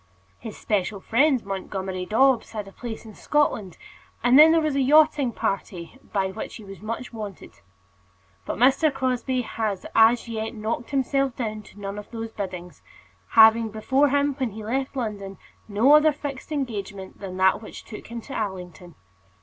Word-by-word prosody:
His 220 - -8
special 205 -1 -1
friend 260 +4 +2
Montgomerie 190 -1 -4
Dobbs 260 +2 +3
had 210 -2 -5
a - - -11
place 230 +1 -7
in 220 - -11
Scotland, 215 - 0 0.5
and 245 +3 +6
then 315 +1 +9
there 330 - +4
was 310 -3 0
a 275 - +2
yachting 295 -1 +4
party 185 -5 -4
by 190 -1 0
which - - -7
he 220 - -10
was 195 -1 -11
much 230 +3 -5
wanted. 210 - -8 0.9
But - - -3
Mr. 270 +6 +4
Crosbie 255 -1 -1
had 215 -4 -3
as 225 +2 +5
yet 225 0 -4
knocked 225 +2 -3
himself 275 -1 0
down 215 -3 -4
to 205 - -16
none 200 0 -5
of 210 - -11
these 225 -1 -6
biddings, 180 -4 -7 0.5
having 225 0 +7
before 265 +7 +2
him 285 +1 +2
when 260 -3 0
he 220 +1 -8
left 265 +4 -2
London 205 -6 -4 0.3
no 220 +7 +4
other 300 +1 +6
fixed 285 0 -7
engagement 205 -9 -5
than 185 -2 -7
that 190 +2 +3
which 220 - -10
took 215 - -10
him 235 0 -6
to 270 - -10
Allington. 180 -4 -5
225 Hz, 170 wpm, -24 LUFS, 200-265 Hz, 0.9 s, then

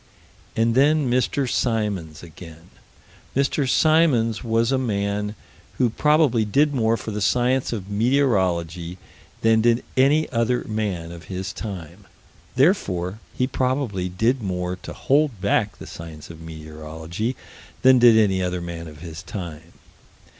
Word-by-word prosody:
And 115 +1 +2
then 140 +1 +3
Mr. 130 +2 +1
Symons 105 - -1
again. 80 0 -13 0.6
Mr. 140 0 +1
Symons 135 -9 +3
was 115 +1 +1
a 135 - +2
man 105 -3 -2 0.4
who 120 -3 +2
probably 150 -4 +3
did 145 +8 +2
more 115 -3 +2
for 110 - -6
the 105 0 -4
science 125 +4 +1
of 100 -5 -4
meteorology 95 - 0 0.4
than 110 0 +4
did 120 +1 +3
any 145 +4 +4
other 120 +1 +1
man 100 -6 -3
of 85 0 -10
his 95 0 -5
time: 95 -8 -7 0.5
therefore 105 - +1 0.2
he 125 - +2
probably 125 -8 -1
did 115 +8 +1
more 90 -2 -2
to - - -9
hold 140 -5 +1
back 105 +1 0
the - - -10
science 80 -2 -9
of 80 -1 -12
meteorology 80 +7 -6 0.5
than 130 -1 +7
did 120 -2 +7
any 95 -4 +3
other 90 0 -1
man 85 -1 -6
of 75 -1 -12
his 85 +1 -8
time. 85 -4 -8
110 Hz, 140 wpm, -23 LUFS, 90-125 Hz, 0.6 s, than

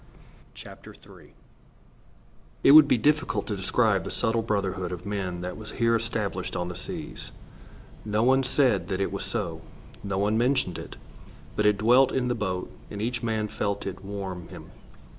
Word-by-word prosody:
III - - -13 1.3
It - - +7
would 155 0 +10
be - - +3
difficult 145 -5 +1
to 105 - -3
describe 100 0 +1
the - - -5
subtle 115 +1 +1
brotherhood 95 -5 -2
of 90 0 -6
men 95 -4 -3
that 90 0 -5
was 110 -1 -8
here 115 -1 +2
established 110 -5 -2
on 90 0 -2
the 90 - -6
seas. 90 - -7 0.7
No 105 +1 0
one 130 +2 +4
said 125 - +2
that 95 -1 -2
it 95 - 0
was - - -3
so. - - -3 0.4
No 100 -1 -2
one 105 +3 +1
mentioned 125 - +1
it. - - -9 0.6
But 105 - +2
it 105 -1 +3
dwelt 120 +6 +5
in 125 -2 0
the - - +2
boat, 95 -5 -3 0.2
and 100 - -7
each 115 +2 -2
man 110 -2 -1
felt 100 -1 -3
it 95 0 -6
warm 95 -3 -6
him. - - -11
105 Hz, 170 wpm, -26 LUFS, 95-115 Hz, 1.3 s, would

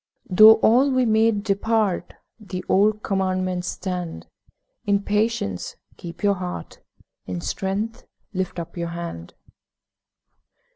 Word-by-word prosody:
Though 215 +4 +9
all 250 +6 +5
we 255 -1 +2
made 220 -2 +2
depart, 210 -1 0 0.2
The 185 -4 -7
old 210 +2 +2
Commandments 185 -2 -1
stand; 180 -3 -4 0.6
'In 200 -2 +1
patience 210 - -1 0.2
keep 170 +3 -10
your 200 -1 +4
heart, 180 - -6 0.5
In 90 -1 -4
strength 200 - -3 0.3
lift 185 -1 -3
up 170 -1 -6
your 170 -1 -3
hand.' 170 - -7
195 Hz, 110 wpm, -23 LUFS, 180-215 Hz, 0.6 s, Though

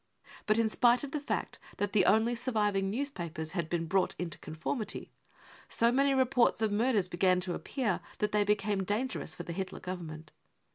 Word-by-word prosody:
But 215 +1 +3
in 230 -1 +3
spite 240 +3 +3
of 280 - -5
the 300 - -1
fact 285 - -3 0.2
that 205 -1 -1
the 200 -4 +4
only 225 +2 +4
surviving 210 -5 0
newspapers 175 - -3
had 170 -4 -2
been 165 -1 -1
C£ - - -11
brought 190 0 +2
into 175 -2 -4
conformity, 195 - -4 0.6
55 - - -5
so 235 +1 +5
many 275 +2 +3
reports 255 -3 +3
of 215 - +2
murders 215 -2 +2
began 180 +1 +2
to 180 -1 -1
appear 230 -4 -1 0.2
that 210 0 0
they 210 0 +3
became 205 -1 +1
dangerous 210 -3 -2
for 175 - -6
the 170 - -5
Hitler 190 +1 -4
Government. 160 -4 -7
205 Hz, 190 wpm, -31 LUFS, 180-235 Hz, 0.6 s, so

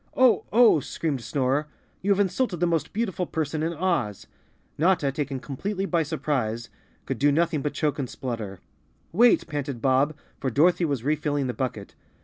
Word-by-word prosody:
"Oh! 255 -3 +5
Oh!" 230 -7 +6
screamed 140 -1 -3
Snorer. 140 +3 0 0.3
"You 195 - -2
have 200 0 +4
insulted 195 -1 0
the 175 - +3
most 165 -2 0
beautiful 190 -5 -2
person 155 -1 -2
in 165 +2 -1
Oz." 150 - -1 0.5
Notta, 160 -4 +2
taken 140 -1 -3
completely 195 +10 -3
by 170 -4 +1
surprise, 130 -7 -2 0.4
could - - -3
do 145 +1 +4
nothing 160 0 +1
but 150 - -3
choke 150 -2 0
and 130 -3 -2
splutter. 110 -7 -5 0.5
"Wait!" 235 +7 +5
panted 145 -5 -4
Bob, 135 +5 +2 0.2
for 135 - -1
Dorothy 170 +7 +3
was 140 -6 -2
refilling 145 -1 0
the 125 - -2
bucket. 110 -4 -4
150 Hz, 165 wpm, -25 LUFS, 135-175 Hz, 0.5 s, Oh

